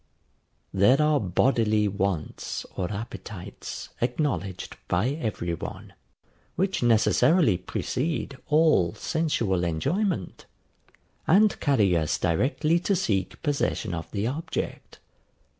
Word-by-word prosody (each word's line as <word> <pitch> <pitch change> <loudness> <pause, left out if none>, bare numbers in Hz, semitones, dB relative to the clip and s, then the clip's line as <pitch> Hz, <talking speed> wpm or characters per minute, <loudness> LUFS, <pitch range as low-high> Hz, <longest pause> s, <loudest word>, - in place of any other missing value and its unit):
There 100 +8 +5
are 150 -1 +3
bodily 105 +1 +2
wants 100 -5 -3
or 90 +1 -2
appetites 105 -2 -7
acknowledged 120 - -2
by 95 +8 +1
every 110 - -3
one, 85 - -7 0.6
which 190 +1 0
necessarily 120 - +4
precede 140 - -3
all 150 - +3
sensual 115 - 0
enjoyment, 110 - -1 0.8
and 205 +5 +4
carry 110 - +3
us 80 -2 +1
directly 150 - +1
to 195 +3 +1
seek 100 - -1
possession 140 - -1
of 80 -1 -5
the 100 0 -2
object. 160 +7 -4
115 Hz, 100 wpm, -26 LUFS, 95-155 Hz, 0.8 s, There